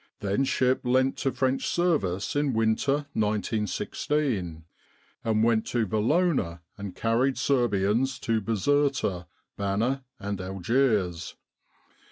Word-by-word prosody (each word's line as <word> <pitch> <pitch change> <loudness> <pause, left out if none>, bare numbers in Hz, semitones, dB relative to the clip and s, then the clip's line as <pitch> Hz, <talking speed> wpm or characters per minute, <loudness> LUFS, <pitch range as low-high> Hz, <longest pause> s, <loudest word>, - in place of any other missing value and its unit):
Then 100 +7 +1
ship 130 0 +1
lent 130 +1 +2
to 135 - 0
French 130 +1 0
service 145 - 0
in 145 -2 +1
winter 115 +6 +1
1916, 105 - -1 0.6
and 110 -1 +1
went 115 -1 +2
to 120 -2 0
Valona 110 - +1
and 100 -2 -7
carried 120 +4 +1
Serbians 120 0 +1
to 115 -1 0
Bizerta, 115 - 0 0.3
Bana 110 +7 0 0.2
and 100 -1 -4
Algiers. 95 -2 0
115 Hz, 105 wpm, -27 LUFS, 100-135 Hz, 0.6 s, lent